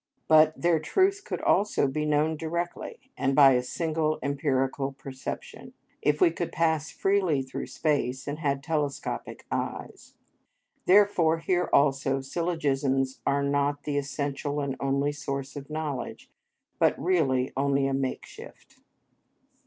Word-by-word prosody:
But 155 0 +5
their 170 -2 +3
truth 385 - +1
could - - -4
also 200 -8 +2
be 150 +3 -2
known 150 +1 +2
directly, 170 - -5
and 135 0 0
by 140 -1 +8
a 125 -1 +3
single 155 +3 -1
empirical 135 -1 -1
perception, 135 -1 -8 0.3
if 150 0 +1
we 170 - +5
could 170 +1 -4
pass 160 -1 +1
freely 185 -8 +1
through 130 - -6
space 140 -5 -1
and 145 +2 -4
had 140 -3 -1
telescopic 150 -3 -3
eyes. - - -5 0.7
Therefore, 185 -4 +5
here 180 +2 0
also 135 -1 +3
syllogisms 135 -3 -1
are 140 0 +2
not 145 +1 0
the 145 -1 -1
essential 140 +1 -3
and 140 -2 -2
only 140 +1 0
source 140 -1 -5
of 140 0 -8
knowledge, 150 -5 -5 0.5
but - - +3
really 140 -7 +1
only 140 0 +1
a 135 - 0
makeshift. 135 -1 -6
145 Hz, 130 wpm, -27 LUFS, 135-160 Hz, 0.7 s, by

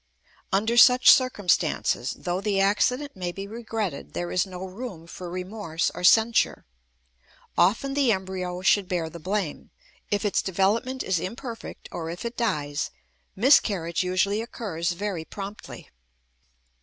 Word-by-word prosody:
Under 220 +4 +1
such 250 +1 +8
circumstances, 230 -8 +1
though 180 0 -2
the 200 -1 0
accident 250 +8 +1
may 180 -2 -3
be 195 +2 -6
regretted, 220 -6 -5
there 175 0 -3
is 180 +2 +1
no 185 0 -7
room 190 -3 -8
for 175 +1 -8
remorse 180 -2 -3
or 180 - -7
censure. 225 +5 +4 0.9
Often 215 +10 +2
the 275 -4 +3
embryo 185 -2 -3
should 195 0 +3
bear 170 -3 -2
the 170 - -9
blame; 185 -2 -3 0.4
if 205 +1 0
its 205 - +2
development 210 +8 0
is 185 -3 0
imperfect 230 +5 -7
or 165 -1 -5
if 175 +6 -6
it 235 0 -4
dies, 150 -10 -1 0.5
miscarriage 195 - +3
usually 185 +3 +1
occurs 175 -7 -3
very 190 -2 -3
promptly. 200 +4 -9
195 Hz, 135 wpm, -25 LUFS, 180-225 Hz, 0.9 s, such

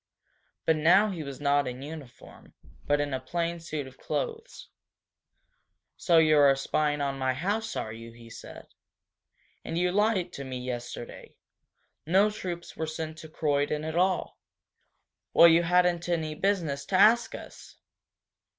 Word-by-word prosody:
But 160 - +3
now 185 +7 +4
he 175 -4 -5
was 140 -3 -7
not 145 -1 +2
in 125 +1 -6
uniform, 145 -4 -12 0.3
but 145 0 +2
in 145 -1 -2
a 130 - -1
plain 170 +5 -3
suit 155 -3 -5
of 130 0 -14
clothes. 465 0 -5 1.3
"So 170 -2 +2
you 155 -2 +5
are 140 -1 +6
spying 145 +2 -1
on 135 -1 -2
my 130 -1 0
house, 205 +9 -2
are 110 - -4
you?" 115 +1 -10
he 115 0 -15
said. 115 - -11 1.0
"And 165 - -4
you 180 +1 +1
lied 195 -3 +1
to 140 - -6
me 130 -1 -5
yesterday! 120 -1 -7 0.7
No 195 +5 +4
troops 180 -5 -6
were 160 - -3
sent 160 0 -6
to 160 - -11
Croydon 150 -1 -1
at 160 +1 -4
all!" 185 +1 0 1.0
"Well, 170 - +9
you 165 0 +5
hadn't 175 0 +2
any 160 -3 -1
business 160 -6 -1
to 190 - -1
ask 220 +5 +5
us!" - - -12
160 Hz, 150 wpm, -28 LUFS, 140-180 Hz, 1.3 s, Well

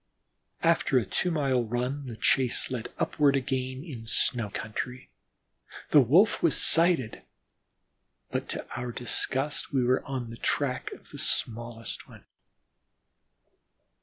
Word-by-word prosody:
After - - +3
a - - +2
two 180 - -1
mile 135 -7 +1
run 125 +5 -3
the 120 - -6
chase 130 -2 +2
led 120 -3 -4
upward 145 -2 +2
again 130 0 -2
in 125 -9 -9
snow 115 -1 +1
country; 125 +5 -6 0.8
the 145 - +8
Wolf 165 - +4
was 165 - +3
sighted, 165 -9 +3 1.1
but - - -3
to - - -3
our 120 +1 -4
disgust, 135 +4 -1
we 135 -3 +2
were 125 +1 +2
on 130 -5 -4
the 115 - -8
track 130 0 -1
of - - -15
the - - -9
smallest 115 0 -2
one. - - -15
130 Hz, 130 wpm, -28 LUFS, 120-140 Hz, 1.1 s, the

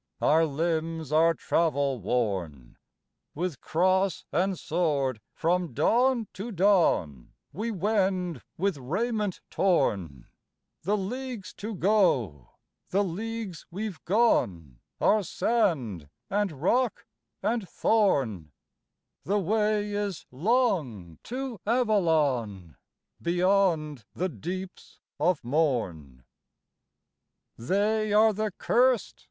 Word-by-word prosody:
Our 160 +2 +4
limbs 160 0 -2
are 165 +2 +4
travel 140 -5 0
worn; 95 - -2 0.6
With 165 -4 -3
cross 185 +2 +1
and 185 +5 0
sword 145 -9 -1
from 170 -4 0
dawn 240 - +2
to 210 +5 -6
dawn 170 - +2 0.2
We 215 +9 -3
wend 190 - 0 0.2
with 195 -1 0
raiment 205 - -2
torn: 95 - 0 0.6
The 205 +5 0
leagues 235 +1 -5
to 215 +1 -5
go, 160 - +1 0.4
the 200 +2 +2
leagues 205 -1 -5
we've 195 -1 -5
gone 90 - +1 0.2
Are 215 - +4
sand 155 - 0 0.2
and 205 -1 +1
rock 195 - 0 0.4
and 225 -5 -1
thorn 125 - +1 0.7
The 205 +3 0
way 210 +1 +1
is 205 -4 -3
long 140 - 0
to 255 -3 -5
Avalon 150 - +1 0.5
Beyond 170 - +1
the 185 +2 -1
deeps 180 - -7 0.2
of 170 +2 +1
morn." 110 - -1 1.4
III. 115 - -9
They 210 +2 +1
are 215 +1 +5
the 215 +1 -1
curs'd! 250 -1 +2
180 Hz, 100 wpm, -27 LUFS, 135-210 Hz, 1.4 s, are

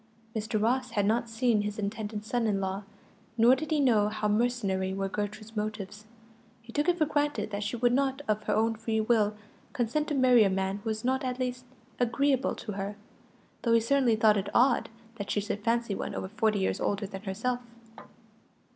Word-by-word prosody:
Mr. 215 0 -1
Ross 250 +4 +1
had 210 -3 0
not 230 +2 +1
seen 225 -1 +2
his 210 0 -4
intended 210 0 -4
son 235 0 0
in 200 -2 +1
law, 190 0 -2 0.6
nor 235 +3 +6
did 310 +4 -5
he 310 -2 +2
know 220 -7 +4
how 215 0 -2
mercenary 205 -4 0
were 195 0 -1
Gertrude's 210 +2 -5
motives. 210 0 -4 0.6
He 235 0 -12
took 295 +4 +1
it 350 - +2
for 310 - +3
granted 290 -8 -1
that 200 0 -3
she 210 +3 -2
would 240 +1 +2
not, 270 +1 +1
of 215 0 +1
her - - +1
own 225 +1 +2
free 225 0 -2
will, 215 -2 +2 0.4
consent 255 +6 0
to 300 - -1
marry 250 -3 +6
a 200 - +3
man 190 +1 -1
who 215 +2 -5
was 220 +2 -3
not 260 +1 +1
at 255 -1 -2
least 250 -1 -3 0.3
agreeable 265 +2 +1
to 215 - -6
her, 200 +1 -4 0.7
though 230 - +2
he 230 - +6
certainly 245 0 +3
thought 215 -1 +4
it 200 +1 -2
odd 245 0 +4 0.3
that 200 -2 -5
she - - +1
should 205 0 -4
fancy 230 -1 +1
one - - -4
over 190 - -4
forty 215 0 +1
years 190 - 0
older 200 0 0
than 195 -1 -7
herself. 225 +5 -2
220 Hz, 200 wpm, -29 LUFS, 205-245 Hz, 0.7 s, nor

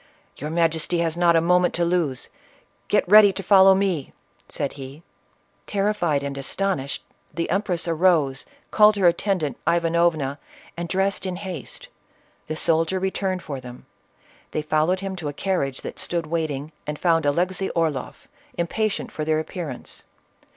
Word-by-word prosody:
"Your 150 - -5
majesty 165 +1 +1
has 165 -1 0
not 170 -1 +4
a 165 - +4
moment 180 +1 +3
to 170 - +1
lose; 170 -7 0 0.6
get - - +2
ready 205 +1 +8
to 195 - -6
follow 190 0 +7
me!" 190 -8 -1 0.4
said 140 - -3
he. 140 +3 -10 0.6
Terrified 195 -8 0
and 140 0 -4
astonished, 140 -2 -2 0.3
the 170 -1 -3
empress 185 -4 0
arose, 160 -5 +2 0.2
called 210 0 +6
her 195 -2 +1
attendant 175 -4 +1
Ivanovna, 165 -4 +1 0.4
and 170 0 -5
dressed 195 +1 0
in 185 - -3
haste. 185 -6 -6 0.6
The 155 - -3
soldier 165 +3 +2
returned 190 -1 -2
for 140 -3 -6
them; 125 -1 -11 0.7
they 155 - -1
followed 155 +5 +1
him 195 -1 -4
to 165 -4 -5
a - - -6
carriage 140 -6 -1
that - - -6
stood 170 -2 -1
waiting, 155 -2 -3 0.2
and 150 0 -3
found 165 -3 +2
Alexey 180 +6 0
Orloff, 155 -6 -2 0.3
impatient 210 +5 -1
for 155 - -4
their 155 0 +1
appearance. 155 -4 -6
170 Hz, 150 wpm, -23 LUFS, 150-185 Hz, 0.7 s, ready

